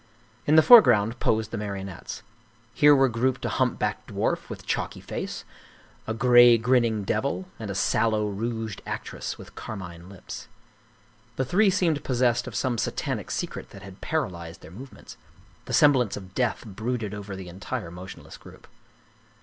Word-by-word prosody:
In 150 - +5
the 160 - +8
foreground 120 - +7
posed 110 0 0
the 115 - -3
marionettes. 100 -3 -6 0.5
Here 145 +3 +6
were 135 -1 +4
grouped 125 +2 -1
a - - 0
humpbacked - - -1
dwarf - - -2
with - - -8
chalky - - -2
face, - - -6 0.6
a 110 - -1
gray, 120 0 +7
grinning 115 -2 +2
devil, 140 - -1
and 110 -2 -6
a 100 - -4
sallow, 110 +1 +1
rouged 110 +1 -4
actress - - -5
with - - -13
carmine 90 -4 -8
lips. 95 -2 -9 0.9
The 130 - -1
three 195 - +3
seemed 175 -6 +1
possessed 120 -1 +1
of 120 - -7
some 120 +3 0
satanic - - -3
secret - - -4
that 100 - -12
had 95 0 -12
paralyzed 85 - -3
their 80 - -13
movements. 125 +8 -12 0.5
The 125 - -6
semblance 130 -5 +4
of 95 -1 -11
death 125 0 -1
brooded 110 +1 -4
over 100 -1 -6
the 95 -1 -8
entire 85 -1 -6
motionless 90 +2 -10
group. - - -15
110 Hz, 155 wpm, -26 LUFS, 100-125 Hz, 0.9 s, the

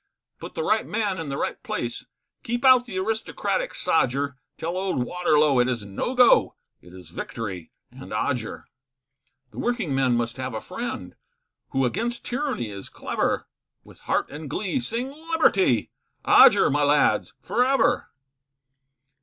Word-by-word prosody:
Put - - -9
the 480 - -2
right 220 - +1
man 205 -4 -1
in 160 -3 -5
the 140 - -3
right - - -3
place, - - -4 0.3
Keep 240 +2 -3
out 255 -2 +7
the 190 - -5
aristocratic 225 - -2
sodger 140 -2 +1 0.2
Tell 170 +2 -3
old 185 -9 -1
Waterlow 150 -5 +2
it 125 +1 +3
is 115 -5 -3
no 100 - -3
go 250 -1 +5 0.3
It 90 - -16
is 90 0 -13
victory 90 -4 -6 0.2
and - - -11
Odger; - - -2 0.9
The - - -9
working 240 - -1
men 130 -2 +2
must 115 +1 -2
have 130 -2 -4
a - - -2
friend, - - -6 0.5
Who 135 0 +1
against 235 - -2
tyranny 250 - -2
is 100 -1 -8
clever, - - -2 0.4
With - - -17
heart - - -1
and 150 0 -7
glee, 205 - -1
sing 245 +2 -3 0.2
liberty, 195 - +3 0.3
Odger, - - +7
my 145 +2 +1
lads, 145 +1 +2
for 245 - +1
ever. 255 -1 +2
165 Hz, 150 wpm, -24 LUFS, -, 0.9 s, out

